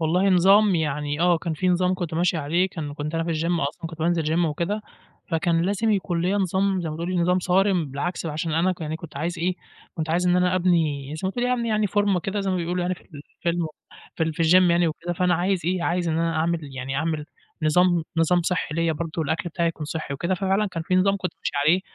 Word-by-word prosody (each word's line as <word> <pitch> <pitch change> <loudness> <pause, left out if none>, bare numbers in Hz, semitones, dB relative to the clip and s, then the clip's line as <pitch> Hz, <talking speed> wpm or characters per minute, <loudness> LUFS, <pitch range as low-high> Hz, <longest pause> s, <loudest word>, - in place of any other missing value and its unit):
والله 180 +5 +2
نظام 195 +2 +5
يعني 150 -1 -1
آه، 175 -1 +4
كان 160 0 -3
في 185 +4 0
نظام 180 +1 +2
كنت 175 -3 -4
ماشي 175 +1 +1
عليه، 165 +5 +1
كان 150 -5 -6
كنت 150 +2 -4
أنا 165 0 0
في 170 - -3
الgym 165 +2 0
أصلًا 165 +2 -8
كنت 165 0 -9
بانزل 170 +1 +1
gym 175 - +3
وكده، 170 +7 -2 0.5
فكان 165 0 +1
لازم 205 +4 +1
يكون 180 -4 0
ليّا 185 +3 +1
نظام 190 0 +1
زي 170 - -3
ما 155 - -5
تقولي 175 +2 -2
نظام 180 +1 +2
صارم، 185 -1 +2
بالعكس 165 +5 -3
بقى 155 - -3
عشان 160 +1 -2
أنا 170 +4 +2
كان 175 - -9
يعني 155 +1 -3
كنت 160 -3 -11
عايز 170 +4 -3
إيه، 180 +2 0 0.4
كنت 160 -1 -3
عايز 180 +2 +1
إن 175 - +4
أنا 180 0 +2
أبني 160 -6 +1
زي - - -7
ما 190 - +1
تقولي 245 +4 0
أبني 235 -2 -1
يعني 215 -1 +2
فورمة 205 -2 +1
كده 200 +3 -2
زي 195 - -1
ما 185 - 0
بيقولوا 175 +1 -1
يعني 180 +1 0
في - - -19
الفيلم 170 +2 -4 0.5
في - - -2
ال 160 -1 0
في 165 - -1
الgym 180 +2 +5
يعني 170 0 +3
وكده، 170 +2 -4
فأنا 180 +1 +2
عايز 180 +2 0
إيه، 180 0 0
عايز 175 0 0
إن 160 0 0
أنا 165 -1 0
أعمل 155 -4 -2
يعني 135 +1 -3
أعمل 155 -1 -1 0.4
نظام 175 +1 +3
نظام 175 +2 +3
صحّي 165 -3 -1
ليّا 165 0 +1
برضو 165 +1 -3
الأكْل 165 +3 -2
بتاعي 170 0 0
يكون 160 -2 -5
صحّي 155 -2 -4
وكده، 170 +7 -1
ففعلًا 195 +2 +1
كان 170 -4 -4
في 185 - -1
نظام 195 +2 +3
كنت 185 -3 -4
ماشي - - -3
عليه 170 +5 +4
170 Hz, 245 wpm, -24 LUFS, 160-185 Hz, 0.5 s, نظام